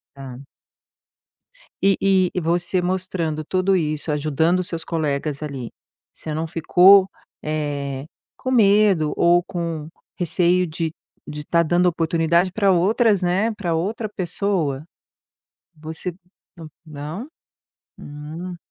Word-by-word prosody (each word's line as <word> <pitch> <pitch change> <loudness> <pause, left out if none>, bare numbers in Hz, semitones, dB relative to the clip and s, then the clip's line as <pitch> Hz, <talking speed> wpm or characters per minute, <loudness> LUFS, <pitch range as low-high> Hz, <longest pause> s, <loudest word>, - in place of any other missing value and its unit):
Tá. 135 -2 -9 1.4
E 195 0 +4
e 190 -2 +3
e 180 - 0
você 175 +2 0
mostrando 180 -4 -2
tudo 185 +4 +1
isso, 155 -3 -1
ajudando 155 +4 +1
os 180 - -2
seus 165 -1 -4
colegas 150 -2 -2
ali, 135 -6 -6 0.4
você 155 - -6
não 160 +2 -2
ficou, 185 +4 +5 0.3
eh, 145 -3 -3 0.3
com 255 - -4
medo, 200 -8 +4
ou 175 +1 +4
com 165 -4 -4 0.3
receio 180 +1 +2
de 160 0 -3 0.3
de 150 0 -7
tá 170 +2 +2
dando 175 +2 +2
oportunidade 170 +1 +2
para 200 -1 +3
outras 200 +3 +2
né, 190 +6 +1
pra 175 -5 -2
outra 210 +7 -2
pessoa? 180 -7 -2 0.9
Você 160 +3 -6 0.4
não 165 -3 -10 0.2
Não? 155 - -7 0.7
Hum. 155 +5 -8
170 Hz, 120 wpm, -22 LUFS, 155-185 Hz, 1.4 s, ficou